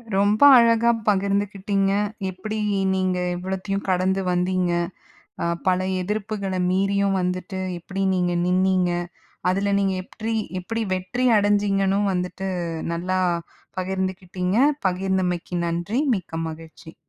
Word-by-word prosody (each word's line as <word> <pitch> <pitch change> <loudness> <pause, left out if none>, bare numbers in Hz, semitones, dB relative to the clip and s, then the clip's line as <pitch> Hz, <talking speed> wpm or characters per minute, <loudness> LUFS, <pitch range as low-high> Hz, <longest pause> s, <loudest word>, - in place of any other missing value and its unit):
ரொம்ப 205 +2 +2 0.2
அழகா 235 0 +5 0.2
பகிர்ந்துகிட்டீங்க. 200 0 +1 0.4
எப்டி 190 +4 -5 0.4
நீங்க 185 -1 0 0.2
இவ்வளத்தையும் 190 +2 -3
கடந்து 185 +1 +1
வந்தீங்க. 180 0 +1 0.7
அ 170 - 0 0.2
பல 185 0 +3 0.2
எதிர்ப்புகள 205 0 -3 0.2
மீறியும் 195 +1 +1
வந்துட்டு, 180 +1 -3 0.2
எப்டி 190 +3 -5
நீங்க 180 -1 +1
நின்னீங்க. 185 0 +2 0.6
அதுல 200 +2 0
நீங்க 195 -1 +1
எப்ரீ 225 +4 -4 0.3
எப்டி 225 +5 -3
வெற்றி 185 +8 -2
அடஞ்சீங்கன்னு 200 -1 +2
வந்துட்டு 180 +1 -3 0.4
நல்லா 180 +2 -1 0.6
பகிர்ந்துக்கிட்டிங்க. 185 0 -2 0.3
பகிர்ந்தமைக்கு 185 -1 -1
நன்றி. 175 +9 -1
மிக்க 175 -4 -5
மகிழ்ச்சி. 160 0 -12
190 Hz, 100 wpm, -23 LUFS, 180-200 Hz, 0.7 s, அழகா